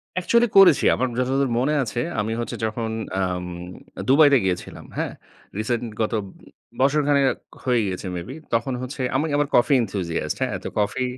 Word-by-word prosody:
Actually 235 Hz, +6 st, +3 dB
করেছি। 185 Hz, -6 st, +7 dB
আমার 130 Hz, -, 0 dB
যতদূর 135 Hz, +1 st, +1 dB
মনে 135 Hz, +5 st, +1 dB
আছে, 115 Hz, -1 st, -4 dB, 0.2 s
আমি 105 Hz, +2 st, -1 dB
হচ্ছে 120 Hz, -, -4 dB
যখন 110 Hz, +1 st, -3 dB, 0.3 s
এম 90 Hz, -1 st, -1 dB, 0.5 s
আ -, -, -2 dB
দুবাইতে 145 Hz, 0 st, +6 dB
গিয়েছিলাম। 90 Hz, -2 st, -3 dB
হ্যাঁ? -, -, -1 dB, 0.5 s
রিসেন্ট 115 Hz, +2 st, -1 dB, 0.2 s
গত 110 Hz, -, 0 dB, 0.7 s
বছর 140 Hz, +3 st, +3 dB
খানেক 140 Hz, -2 st, +3 dB, 0.3 s
হয়ে 125 Hz, -2 st, +2 dB
গিয়েছে 95 Hz, 0 st, -4 dB
মেবি, 90 Hz, +10 st, -6 dB, 0.2 s
তখন 125 Hz, +3 st, +1 dB
হচ্ছে 130 Hz, +2 st, -5 dB
আমি, 140 Hz, +4 st, +2 dB
আমার 145 Hz, 0 st, +1 dB
Coffee 130 Hz, +3 st, +5 dB
Enthusiast 95 Hz, -6 st, -2 dB
হ্যাঁ? -, -, 0 dB
তো -, -, -4 dB
কফি 105 Hz, +5 st, 0 dB
125 Hz, 160 wpm, -23 LUFS, 105-140 Hz, 0.7 s, করেছি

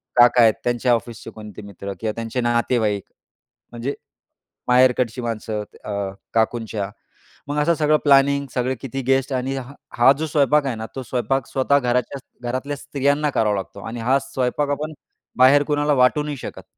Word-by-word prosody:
काका 120 Hz, 0 st, +6 dB
आहेत 110 Hz, -2 st, +6 dB
त्यांच्या 120 Hz, 0 st, +1 dB
ऑफिसचे 115 Hz, -1 st, -4 dB
कोणते 105 Hz, -1 st, -10 dB
मित्र 100 Hz, -1 st, -7 dB
किंवा 110 Hz, -1 st, -1 dB
त्यांचे 115 Hz, +2 st, -3 dB
नातेवाईक 120 Hz, -4 st, +1 dB, 0.7 s
म्हणजे 120 Hz, +4 st, -3 dB, 0.7 s
माहेरकडची 125 Hz, -1 st, +3 dB
माणसं 110 Hz, -2 st, -3 dB, 0.2 s
अ, 105 Hz, -, -6 dB, 0.4 s
काकूंच्या. 110 Hz, -3 st, -1 dB, 0.6 s
मग 145 Hz, +1 st, -3 dB
असं 170 Hz, +3 st, +3 dB
सगळं 155 Hz, 0 st, +3 dB
प्लॅनिंग 140 Hz, 0 st, +4 dB
सगळे 130 Hz, +1 st, 0 dB
किती 135 Hz, 0 st, -4 dB
गेस्ट 135 Hz, 0 st, +2 dB
आणि 130 Hz, +1 st, -1 dB
हा 135 Hz, +1 st, -7 dB, 0.2 s
हा 120 Hz, +3 st, +7 dB
जो 160 Hz, -, -1 dB
स्वयंपाक 145 Hz, 0 st, +3 dB
आहे 130 Hz, -4 st, -1 dB
ना? 110 Hz, 0 st, -5 dB
तो 130 Hz, -, -4 dB
स्वयंपाक 125 Hz, +2 st, -1 dB
स्वतः 140 Hz, +2 st, +2 dB
घराच्या 125 Hz, +2 st, -1 dB, 0.3 s
घरातल्या 140 Hz, +3 st, -3 dB
स्त्रियांना 145 Hz, +1 st, 0 dB
करावा 105 Hz, -6 st, +1 dB
लागतो 100 Hz, +1 st, -6 dB
आणि 115 Hz, +1 st, -5 dB
हा 130 Hz, +4 st, +2 dB
स्वयंपाक 135 Hz, +1 st, -1 dB
आपण 155 Hz, +2 st, -2 dB, 0.4 s
बाहेर 135 Hz, +3 st, +6 dB
कुणाला 145 Hz, 0 st, +1 dB
वाटू 130 Hz, +3 st, +3 dB
नाही 145 Hz, -2 st, -4 dB
शकत -, -, -8 dB
125 Hz, 160 wpm, -22 LUFS, 115-140 Hz, 0.7 s, हा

